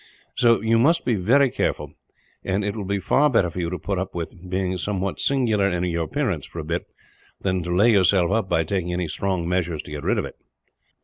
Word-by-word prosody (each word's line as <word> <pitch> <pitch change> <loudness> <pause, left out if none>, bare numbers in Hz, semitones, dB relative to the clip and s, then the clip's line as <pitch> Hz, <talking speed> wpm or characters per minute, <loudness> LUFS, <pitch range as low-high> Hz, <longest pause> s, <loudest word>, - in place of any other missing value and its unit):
So 115 -1 +3
you 115 +1 +2
must 165 +8 +3
be 125 - +2
very 120 +7 +3
careful; - - -2 0.5
and 100 +2 -1
it 105 0 -2
will 105 -3 -4
be 100 +1 -1
far 150 +9 +3
better 95 -9 +2
for 90 - -6
you 85 -1 -1
to 90 - -3
put 95 +3 -3
up 95 -1 -5
with 90 +2 -6
being 95 0 -1
somewhat 95 0 -2
singular 115 -8 +2
in 90 -1 -1
your 85 -2 -1
appearance, - - -2
for - - -13
a 80 - -3
bit, 85 +3 -3 0.5
than 95 -1 0
to 85 +1 -2
lay 110 +6 +5
yourself 95 -3 +3
up 110 -3 0
by 80 - +2
taking 90 +1 -2
any 90 -1 -1
strong 90 +1 -2
measures 85 -3 -1
to - - -12
get 75 -1 -5
rid - - 0
of - - -1
it." - - -10
95 Hz, 230 wpm, -23 LUFS, 90-105 Hz, 0.5 s, lay